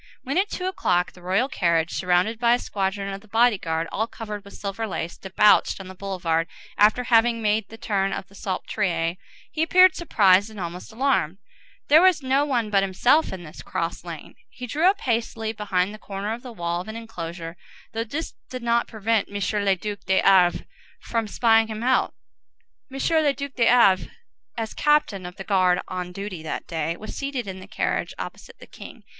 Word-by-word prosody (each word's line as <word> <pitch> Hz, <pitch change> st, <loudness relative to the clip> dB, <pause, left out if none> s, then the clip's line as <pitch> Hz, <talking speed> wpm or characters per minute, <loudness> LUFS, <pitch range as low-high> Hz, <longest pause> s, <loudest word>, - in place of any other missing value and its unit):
When, 275 Hz, +7 st, 0 dB
at 405 Hz, +2 st, +1 dB
two 365 Hz, -, -4 dB
o'clock, 180 Hz, -, 0 dB
the 180 Hz, -, -17 dB
royal 190 Hz, +8 st, +1 dB
carriage, 170 Hz, -, +1 dB
surrounded 185 Hz, +5 st, +1 dB
by 235 Hz, 0 st, +4 dB
a -, -, 0 dB
squadron 195 Hz, -3 st, -3 dB
of 195 Hz, -, -7 dB
the 215 Hz, -, -19 dB
body 225 Hz, -1 st, +3 dB
guard 165 Hz, -1 st, -2 dB
all 220 Hz, +2 st, -1 dB
covered 210 Hz, -3 st, -7 dB
with 200 Hz, -, -13 dB
silver 205 Hz, +3 st, -4 dB
lace, 170 Hz, -4 st, -4 dB
debouched 200 Hz, +3 st, +3 dB
on 190 Hz, -1 st, -9 dB
the -, -, -8 dB
boulevard, 180 Hz, -4 st, -1 dB, 0.3 s
after 215 Hz, +4 st, +4 dB
having 230 Hz, 0 st, +3 dB
made 215 Hz, -1 st, 0 dB
the 225 Hz, -, -11 dB
turn 195 Hz, -3 st, 0 dB
of 190 Hz, -, -5 dB
the 200 Hz, -, -21 dB
Salpêtrière, 180 Hz, -3 st, -2 dB, 0.3 s
he 310 Hz, -, -2 dB
appeared 365 Hz, +3 st, +6 dB
surprised 200 Hz, -, +3 dB
and 215 Hz, -2 st, -10 dB
almost 175 Hz, +3 st, -6 dB
alarmed. 220 Hz, -, 0 dB, 0.5 s
There 305 Hz, +3 st, +7 dB
was 360 Hz, -6 st, +4 dB
no 270 Hz, +2 st, +2 dB
one 240 Hz, -7 st, -1 dB
but 200 Hz, -1 st, +4 dB
himself 240 Hz, +11 st, +2 dB
in 185 Hz, -2 st, -7 dB
this 155 Hz, -, -10 dB
cross 165 Hz, 0 st, -4 dB
lane. 170 Hz, -3 st, -8 dB, 0.2 s
He 250 Hz, -, -8 dB
drew 300 Hz, +8 st, 0 dB
up 400 Hz, +1 st, -1 dB
hastily 225 Hz, -2 st, -1 dB
behind 200 Hz, -2 st, -1 dB
the 215 Hz, -, -10 dB
corner 200 Hz, +2 st, -4 dB
of 235 Hz, -, -7 dB
the 250 Hz, -1 st, -9 dB
wall 175 Hz, -4 st, -2 dB
of 185 Hz, -, -11 dB
an 220 Hz, -, -6 dB
enclosure, 170 Hz, -7 st, -7 dB, 0.4 s
though 225 Hz, 0 st, -1 dB
this 285 Hz, +8 st, -5 dB, 0.2 s
did 255 Hz, -1 st, -6 dB
not 235 Hz, 0 st, +2 dB
prevent 220 Hz, -1 st, 0 dB
M. 205 Hz, -, -11 dB, 0.3 s
le 195 Hz, -1 st, +3 dB
Duc 205 Hz, +2 st, -5 dB
de 190 Hz, 0 st, +3 dB
Havré 185 Hz, -3 st, +4 dB, 0.4 s
from 230 Hz, -2 st, -2 dB
spying 225 Hz, +1 st, +3 dB
him 220 Hz, 0 st, -5 dB
out. 260 Hz, +1 st, +2 dB, 0.8 s
M. 270 Hz, -, -6 dB, 0.3 s
le 285 Hz, -2 st, +3 dB
Duc 280 Hz, -1 st, -6 dB
de 235 Hz, -2 st, +2 dB
Havré, 210 Hz, -6 st, +5 dB, 0.5 s
as 225 Hz, -1 st, -3 dB
captain 260 Hz, -11 st, +1 dB
of 180 Hz, -, -10 dB
the 195 Hz, -, -7 dB
guard 185 Hz, -2 st, +3 dB
on 180 Hz, -1 st, -5 dB
duty 195 Hz, -2 st, -6 dB
that 160 Hz, -, -5 dB
day, 165 Hz, +1 st, -3 dB
was 215 Hz, -, -8 dB
seated 275 Hz, -4 st, -3 dB
in 190 Hz, -1 st, -7 dB
the 185 Hz, -, -11 dB
carriage, 215 Hz, -, -2 dB
opposite -, -, -8 dB
the -, -, -13 dB
king. -, -, -12 dB
210 Hz, 200 wpm, -24 LUFS, 185-235 Hz, 0.8 s, There